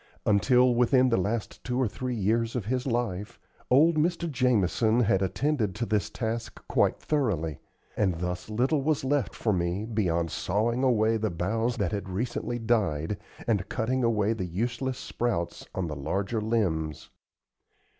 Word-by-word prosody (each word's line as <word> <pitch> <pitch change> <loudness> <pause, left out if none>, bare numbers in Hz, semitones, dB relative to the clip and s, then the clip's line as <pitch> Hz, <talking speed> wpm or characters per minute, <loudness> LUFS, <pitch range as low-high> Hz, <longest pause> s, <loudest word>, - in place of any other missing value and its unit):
Until 125 +4 +4
within 125 +2 +4
the 115 - +2
last 105 +4 -2
two 125 +1 -2
or 130 - +2
three 125 +4 -4
years 115 +3 0
of 120 -6 -2
his 125 +3 -1
life, 115 -3 -2 0.3
old 155 +6 +5
Mr. 170 +2 +1
Jamison 120 - +2
had 100 -4 +2
attended 105 - 0
to 120 +2 -2
this 105 -3 0
task 115 -1 -4
quite - - +2
thoroughly; 95 - -1 0.4
and 95 -4 +1
thus 90 +3 -4
little 130 +7 +1
was 150 0 0
left 140 0 0
for 110 - 0
me 90 +3 -1
beyond 85 -8 0
sawing 115 +6 0
away 115 -3 +3
the 110 0 -1
boughs 110 +8 -1
that 100 -6 0
had 100 -2 -4
recently 120 +4 -2
died, 105 -7 0 0.3
and 100 -4 0
cutting 125 +3 0
out 110 -1 +1
the 95 - -1
useless 125 +8 -2
sprouts 110 -8 -3
on 95 - -1
the 75 -3 -4
larger 100 +10 -2
limbs. 90 -9 -1
110 Hz, 155 wpm, -28 LUFS, 95-125 Hz, 0.4 s, old